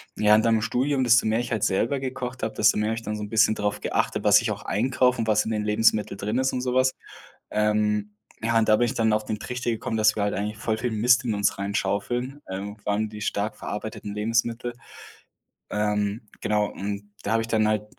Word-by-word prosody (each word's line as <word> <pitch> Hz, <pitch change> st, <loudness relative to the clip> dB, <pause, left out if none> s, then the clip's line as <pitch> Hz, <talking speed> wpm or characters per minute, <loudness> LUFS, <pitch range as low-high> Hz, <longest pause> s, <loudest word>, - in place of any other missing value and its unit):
Ja, 105 Hz, 0 st, +5 dB
und 110 Hz, -, +3 dB
dann 115 Hz, -1 st, +4 dB
im 110 Hz, -, +1 dB
Studium, 130 Hz, +4 st, 0 dB
desto 120 Hz, 0 st, +5 dB
mehr 110 Hz, +2 st, +2 dB
ich 120 Hz, 0 st, -4 dB
halt 110 Hz, -2 st, +1 dB
selber 115 Hz, +8 st, +1 dB
gekocht 125 Hz, -1 st, -5 dB
habe, 110 Hz, -, -2 dB
desto 105 Hz, 0 st, +4 dB
mehr 105 Hz, +1 st, 0 dB
habe 115 Hz, -, -1 dB
ich 115 Hz, -, -6 dB
dann 105 Hz, +1 st, -3 dB
so 105 Hz, -, -5 dB
'n 105 Hz, -, -6 dB
bisschen 110 Hz, -1 st, +4 dB
darauf 105 Hz, 0 st, -2 dB
geachtet, -, -, -1 dB
was 105 Hz, 0 st, +6 dB
ich 115 Hz, -2 st, -1 dB
auch 100 Hz, 0 st, -5 dB
einkaufe 125 Hz, +3 st, +1 dB
und 115 Hz, -, -1 dB
was 105 Hz, -1 st, +3 dB
in 110 Hz, -, -4 dB
den 105 Hz, -1 st, -1 dB
Lebensmitteln 105 Hz, -1 st, +2 dB
drin 105 Hz, +4 st, -2 dB
ist 130 Hz, 0 st, +1 dB
und 125 Hz, -, -1 dB
so 125 Hz, -1 st, -1 dB
was, 130 Hz, 0 st, +3 dB, 0.6 s
ähm, 105 Hz, -1 st, 0 dB, 0.3 s
ja, 115 Hz, 0 st, +1 dB
und 110 Hz, -1 st, +2 dB
da 110 Hz, -, +6 dB
bin 120 Hz, -, +3 dB
ich 120 Hz, -, -2 dB
dann 110 Hz, -1 st, +2 dB
auf 105 Hz, 0 st, 0 dB
den 110 Hz, -1 st, -3 dB
Trichter 125 Hz, -1 st, -4 dB
gekommen, 115 Hz, 0 st, -2 dB
dass 110 Hz, -1 st, +4 dB
wir 105 Hz, -, 0 dB
halt 105 Hz, -, 0 dB
eigentlich 105 Hz, +2 st, -3 dB
voll 110 Hz, 0 st, -1 dB
viel 120 Hz, +1 st, -2 dB
Mist 120 Hz, +3 st, +3 dB
in 115 Hz, -, 0 dB
uns 100 Hz, -1 st, 0 dB
reinschaufeln, 105 Hz, +7 st, -2 dB
irgendwann 105 Hz, +2 st, -3 dB
die 105 Hz, -1 st, -9 dB
stark 105 Hz, +1 st, -2 dB
verarbeiteten 105 Hz, 0 st, -6 dB
Lebensmittel, 115 Hz, +3 st, -1 dB, 1.0 s
ähm, 105 Hz, +1 st, -1 dB
genau, 105 Hz, -1 st, +1 dB
und 100 Hz, +1 st, -6 dB
da 100 Hz, -, -2 dB
habe 115 Hz, -, +3 dB
ich 115 Hz, -, -6 dB
dann 110 Hz, -1 st, +2 dB
halt 105 Hz, -1 st, 0 dB
110 Hz, 235 wpm, -25 LUFS, 105-115 Hz, 1.0 s, was